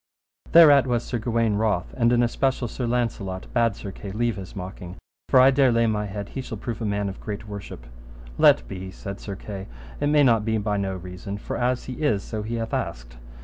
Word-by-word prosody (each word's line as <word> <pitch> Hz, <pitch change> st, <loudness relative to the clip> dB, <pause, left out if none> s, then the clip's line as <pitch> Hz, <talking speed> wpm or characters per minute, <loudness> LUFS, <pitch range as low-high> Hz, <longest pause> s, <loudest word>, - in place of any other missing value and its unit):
Thereat 145 Hz, -5 st, +8 dB
was 120 Hz, -2 st, 0 dB
Sir 120 Hz, -, -3 dB
Gawaine 115 Hz, -2 st, +1 dB
wroth, 105 Hz, -5 st, 0 dB
and 120 Hz, -1 st, +3 dB
in 120 Hz, 0 st, +4 dB
especial 130 Hz, +1 st, 0 dB
Sir 120 Hz, +2 st, -4 dB
Launcelot 110 Hz, -6 st, -2 dB
bade 115 Hz, -3 st, +2 dB
Sir 100 Hz, -, -7 dB
Kay 100 Hz, +1 st, -8 dB
leave 115 Hz, +2 st, 0 dB
his 95 Hz, -2 st, -9 dB
mocking, 90 Hz, -1 st, -7 dB, 0.3 s
for 130 Hz, -, +6 dB
I 130 Hz, +1 st, +7 dB
dare 135 Hz, -1 st, +4 dB
lay 115 Hz, 0 st, +3 dB
my 105 Hz, -2 st, 0 dB
head 100 Hz, 0 st, -6 dB
he 135 Hz, -, -5 dB
shall 115 Hz, -3 st, -6 dB
prove 115 Hz, +2 st, -5 dB
a -, -, -1 dB
man 100 Hz, -1 st, -1 dB
of 95 Hz, -, -6 dB
great 105 Hz, 0 st, -6 dB
worship. 100 Hz, -12 st, -8 dB, 0.5 s
Let -, -, +5 dB
be 95 Hz, +4 st, -6 dB
said 100 Hz, +1 st, -7 dB
Sir 100 Hz, -, -6 dB
Kay, 95 Hz, 0 st, -7 dB, 0.3 s
it 145 Hz, -, +1 dB
may 150 Hz, 0 st, +4 dB
not 115 Hz, -5 st, +4 dB
be 110 Hz, 0 st, 0 dB
by 105 Hz, -1 st, -1 dB
no 95 Hz, -1 st, -2 dB
reason, 90 Hz, +2 st, -7 dB
for -, -, -5 dB
as 125 Hz, +1 st, 0 dB
he 130 Hz, +3 st, -7 dB
is, 105 Hz, -10 st, +1 dB
so 110 Hz, -2 st, -4 dB
he 115 Hz, +2 st, -4 dB
hath 115 Hz, -1 st, -4 dB
asked. -, -, -4 dB
110 Hz, 225 wpm, -24 LUFS, 100-120 Hz, 0.5 s, Thereat